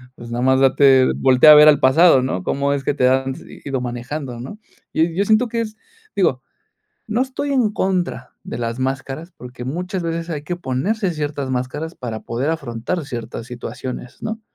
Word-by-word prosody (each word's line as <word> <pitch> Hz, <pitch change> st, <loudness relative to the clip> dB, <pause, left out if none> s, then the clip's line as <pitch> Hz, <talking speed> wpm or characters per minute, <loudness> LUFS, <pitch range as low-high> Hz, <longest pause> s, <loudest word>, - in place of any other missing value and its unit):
pues 120 Hz, -, -10 dB
nada 120 Hz, -, -2 dB
más 130 Hz, 0 st, +4 dB
date 135 Hz, -1 st, +5 dB
voltea 130 Hz, +3 st, +6 dB
a -, -, +10 dB
ver 150 Hz, 0 st, +9 dB
al 150 Hz, -2 st, +6 dB
pasado, 135 Hz, +2 st, +5 dB
¿no? 95 Hz, -8 st, -2 dB
Cómo 140 Hz, +1 st, 0 dB
es 140 Hz, -1 st, -1 dB
que 140 Hz, -, 0 dB
te 125 Hz, -3 st, +2 dB
has 130 Hz, 0 st, +1 dB, 0.4 s
ido 135 Hz, -3 st, -2 dB
manejando, 125 Hz, +1 st, -5 dB
¿no? 130 Hz, -, -8 dB, 0.4 s
Yo 160 Hz, -, +3 dB
yo 170 Hz, +4 st, 0 dB
siento 220 Hz, +4 st, +3 dB
que 230 Hz, +1 st, -1 dB
es 215 Hz, -1 st, -5 dB, 0.4 s
digo, -, -, +1 dB, 0.7 s
no 225 Hz, +3 st, +1 dB
estoy 265 Hz, +2 st, -4 dB
en 250 Hz, -6 st, +2 dB
contra 180 Hz, -10 st, -2 dB
de -, -, -6 dB
las 115 Hz, 0 st, -3 dB
máscaras, 135 Hz, +5 st, -4 dB
porque 125 Hz, 0 st, -9 dB
muchas 180 Hz, +7 st, -3 dB
veces 165 Hz, 0 st, -3 dB
hay 150 Hz, -3 st, -4 dB
que 175 Hz, +4 st, -4 dB
ponerse 180 Hz, -, -1 dB
ciertas 145 Hz, -3 st, -3 dB
máscaras 130 Hz, +6 st, -3 dB
para 115 Hz, -3 st, -5 dB
poder 125 Hz, +5 st, -3 dB
afrontar 145 Hz, +1 st, -3 dB
ciertas 120 Hz, -3 st, -6 dB
situaciones, 125 Hz, +1 st, -7 dB
¿no? 220 Hz, 0 st, -4 dB
140 Hz, 185 wpm, -20 LUFS, 125-175 Hz, 0.7 s, a